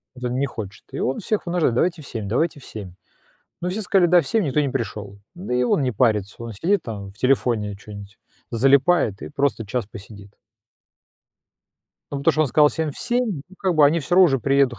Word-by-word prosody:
Вот 125 -1 -9
он 125 +1 -1
не 140 - +1
хочет, 100 -7 -8
и - - -5
он 130 - -1
всех 210 0 -2
вынуждает: 170 -8 +1
"Давайте 170 +4 0
в 135 - -12
7, 110 -4 -5
давайте 145 +5 0
в - - -15
7". 100 -5 -9 0.7
Но 180 - -1
все 205 +4 -3
сказали: 190 -2 +3
"Да, 175 +1 +5
в 150 - -8
7". 220 +6 +1
Никто 150 0 +1
не 140 - +1
пришёл, 105 -6 -5 0.2
да 175 -8 -4
и 125 - +2
он 125 - +2
не 125 -2 0
парится, 105 -3 +1
он 115 - -6
сидит 185 - 0
там 100 -4 -7
в - - -29
телефоне 120 -6 +1
чё-нибудь, 100 0 -11 0.3
залипает 135 - +3
и - - -6
просто 140 -5 -1
час 120 -1 -2
посидит. 100 -2 -12 1.8
Ну 140 - -2
потому 140 - +3
что 155 - 0
он - - +1
сказал 150 +3 +5
всем 160 -1 -2
в - - -11
7, 240 - -1
но 190 - -16
как 185 -3 0
бы 150 -2 +6
они 165 +4 +2
всё 165 +4 -2
равно 190 - +8
уже 135 -4 +1
приедут 135 -2 +2
135 Hz, 225 wpm, -22 LUFS, 110-160 Hz, 1.8 s, равно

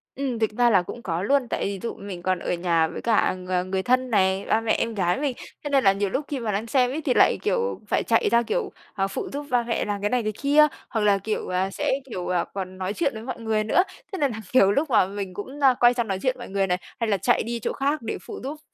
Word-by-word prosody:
Ừm, 260 -4 -2
thực 220 -1 +1
ra 240 -1 +5
là 195 -5 +5
cũng 235 +6 -8
có 170 +1 -2
luôn, 275 +1 +2
tại - - -1
ví 195 -1 -3
dụ 235 - -3
mình 190 -3 -8
còn 185 -1 0
ở - - -2
nhà 170 -2 +2
với - - -7
cả 225 -5 +2
ng 185 0 -2
người 190 0 0
thân 255 0 +2
này, 190 -2 +2
ba, 225 - +2
mẹ, 225 - 0
em 230 -1 -1
gái 185 +4 0
mình, 280 -4 -1 0.3
thế 290 - -3
nên 275 -3 +3
là 195 -1 +6
nhiều 200 0 -1
lúc 285 +8 -2
khi 280 -3 -3
mà 220 -3 -2
đang 210 +4 -2
xem 250 0 +3
ấy 310 +3 -3
thì 265 -4 +1
lại, - - +5
kiểu, 480 0 0
phải - - +1
chạy 225 - +2
ra, 235 0 +4
kiểu, - - -2 0.2
à, 195 -1 0
phụ - - -4
giúp 290 +1 -4
ba 245 -1 +2
mẹ 230 0 -1
làm 205 -1 -3
cái 205 - 0
này 250 -2 +1
cái 215 - -1
kia, 295 +2 +6 0.2
hoặc 220 -3 -1
là, 205 -1 +4
kiểu, 210 0 -3 0.2
sẽ, - - -1 0.2
kiểu, 180 -5 -4 0.2
còn 185 -1 -5
nói 190 +2 -2
chuyện 280 -2 0
với 220 0 -7
mọi 255 -1 -5
người 220 -1 0
nữa. 355 - +3 0.3
Thế 385 - -4
nên 280 -4 +2
là 220 - -6
nhiều 200 -6 +6
lúc 285 +7 0
mà 215 -6 +4
mình 195 -2 -5
cũng, 260 +9 -7
a, 260 -2 +7
quay 240 0 +6
sang 240 -2 -1
nói 190 -1 -2
chuyện 255 -1 +1
mọi 240 - -8
người 195 0 0
này, 180 0 +1 0.2
hay 230 -2 0
là 200 - +2
chạy 240 +6 +2
đi 235 +1 -3
chỗ - - -2
khác 280 +1 0
để 225 - -4
phụ - - -7
giúp, 295 +3 -5
220 Hz, 285 wpm, -24 LUFS, 195-255 Hz, 0.3 s, a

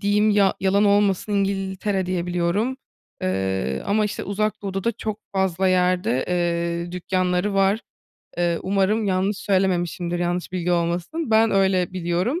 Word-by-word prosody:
diyeyim, 210 +1 +3
ya 200 -2 +3
yalan 195 +2 +3
olmasın, 205 0 +2
İngiltere 195 -1 -1
diye 180 -1 -2
biliyorum, 180 +8 0 0.5
ııı, 95 -7 -1
ama 215 +1 +2
işte 210 - -3
Uzak 210 +2 -2
Doğu'da 195 -1 -3
da 235 - +2
çok 215 -1 -5
fazla 190 -1 +1
yerde, 180 -7 +1 0.6
ııı, 175 - -9
dükkânları 180 +2 0
var. 195 +2 +3 0.6
Iıı, 170 -1 +1
umarım 200 +3 +1
yanlış 195 +1 0
söylememişimdir. 175 -3 0
Yanlış 175 +1 -2
bilgi 180 -1 -1
olmasın. 175 - -1
Ben 220 0 +4
öyle 190 -2 +2
biliyorum, 185 - -1
190 Hz, 140 wpm, -23 LUFS, 175-205 Hz, 0.6 s, Ben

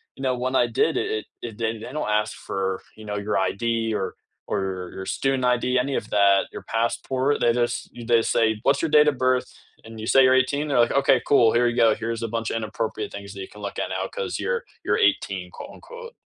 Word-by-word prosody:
you 135 - -9
know, 130 -1 +1
when 130 +1 -1
I 125 - +4 0.2
did 165 - +3
it, - - -3
it 110 - -6 0.2
it 115 - -8
did 110 -1 +1
and 110 - -10
they 125 - -7
don't 130 - -2
ask 105 0 -7
for, 95 - -2 0.4
you 110 - -10
know, 105 0 -3
your 105 - 0
ID 100 - -8 0.4
or 95 - -1 0.4
or - - +1 0.3
your 95 - -6
student 135 -2 0
ID, 120 - -4 0.2
any 140 0 -2
of - - -15
that 100 -1 +5
your - - -7
passport, 130 +4 0
they 120 - +3
just 120 - +1 0.2
you 120 - -8
they 120 - +6
just - - -1
say, 115 - +4 0.2
"What's 140 +1 +3
your 165 - 0
date 150 0 +7
of 140 - -10
birth?" 130 0 +2 0.4
And 115 - -10
you 110 - -5
say 135 - +5
you're 130 0 +5
18, 140 +3 -2
they're 140 -4 +1
like, - - -6
"Okay, 140 - +4
cool, 125 -5 +6
here 120 +1 +4
you 120 - -4
go. 115 - +6
Here's 115 0 -3
a - - -1
bunch 115 0 -2
of - - -3
inappropriate 110 0 -4
things 100 0 -8
that 100 - -8
you - - -8
can 105 - -12
look 100 - -6
at - - -2
now - - -2
'cause 485 -1 -5
you're 485 -1 -1 0.2
you're - - +1
18," - - -2
quote, - - -8
unquote. 485 -1 -11
120 Hz, 255 wpm, -24 LUFS, 110-135 Hz, 0.4 s, date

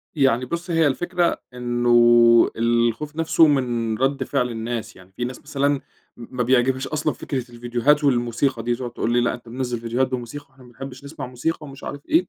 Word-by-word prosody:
يعني 130 -3 +2
بُصّي 170 +4 -4
هي 165 -2 +4
الفكرة 175 +4 0
إنّه 120 -1 +5
الخوف 120 +6 0
نفسه 165 0 +4
مِن 120 -6 0
رد 135 +3 0
فعل 125 -3 -1
الناس، 115 0 -5
يعني 95 +1 -17
في 120 +5 -4
ناس 125 +1 -7
مثلًا 140 0 -1 0.5
م 120 +2 -11
ما 125 - +2
بيعجبهاش 130 +2 +2
أصلًا 155 0 -1
فكرة 135 -3 -4
الڤيديوهات 120 +5 0
والموسيقى 120 -1 +1
دي، 120 0 0
تقعد 120 0 -6
تقول 115 - -2
لي: 120 - +3
"لأ، 120 - +1
أنتَ 120 -1 -10
منزل 120 -1 -3
ڤيديوهات 120 +3 0
بموسيقى، 130 +3 -6
وإحنا 130 -1 -19
ما 125 - -16
بنحبش 130 +2 -9
نسمع 145 +3 -7
موسيقى." 125 +7 -2
ومش 140 0 -12
عارف 145 0 -7
إيه، 330 +3 +2
125 Hz, 190 wpm, -22 LUFS, 120-140 Hz, 0.5 s, إنّه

